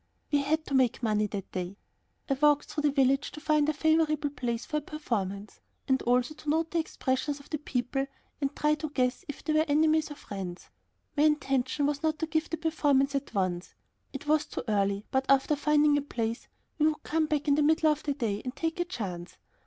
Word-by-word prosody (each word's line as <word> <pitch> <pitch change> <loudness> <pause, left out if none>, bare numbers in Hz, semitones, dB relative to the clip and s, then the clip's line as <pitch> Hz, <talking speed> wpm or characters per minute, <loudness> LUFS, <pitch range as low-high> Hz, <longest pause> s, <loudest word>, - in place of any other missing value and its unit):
We 290 - +4
had 315 +3 0
to - - -6
make 255 -2 +2
money 215 -1 +2
that 200 -2 -6
day. 185 +2 -4 0.5
I 275 - +2
walked 295 +1 +3
through 300 - -3
the 295 -1 +3
village 275 0 +2
to - - -7
find 305 -1 +2
a - - +1
favorable 310 -1 +2
place 240 -4 -3
for 300 - -2
a - - -1
performance, 210 -10 -4 0.3
and 265 0 +2
also 245 +4 +2
to 305 0 -7
note 320 +1 +1
the 340 - +1
expressions 285 -2 -1
of 280 - -17
the 305 - -1
people, 270 -1 -2 0.3
to 275 - +1
try 300 - +2
and 305 -1 -2
guess 250 -1 +1
if 290 - -7
they 310 - 0
were 310 +1 +3
enemies 310 +1 +3
or 295 - -7
friends. 190 -8 -7 0.4
My 290 - +2
intention 275 -2 +1
was 285 -1 0
not 315 -1 0
to 320 - -1
give 315 0 -1
the 330 - -2
performance 290 -4 +2
at 275 -4 -3
once. 185 -2 -1 0.4
It 275 - -7
was 300 0 +2
too - - -5
early, 200 -1 +1
but 265 0 +1
after 275 +2 +4
finding 295 0 +3
a - - -3
place 230 -5 -3 0.3
we 305 - +5
would 310 -1 -1
come 315 0 0
back 300 -1 -1
in 285 - +5
the 300 - +3
middle 310 +1 +4
of 300 0 -2
the 285 -2 -2
day 215 -6 -2
and 255 +1 -5
take 330 +2 -2
a 350 - +1
chance. 185 - -6
285 Hz, 220 wpm, -29 LUFS, 250-305 Hz, 0.5 s, we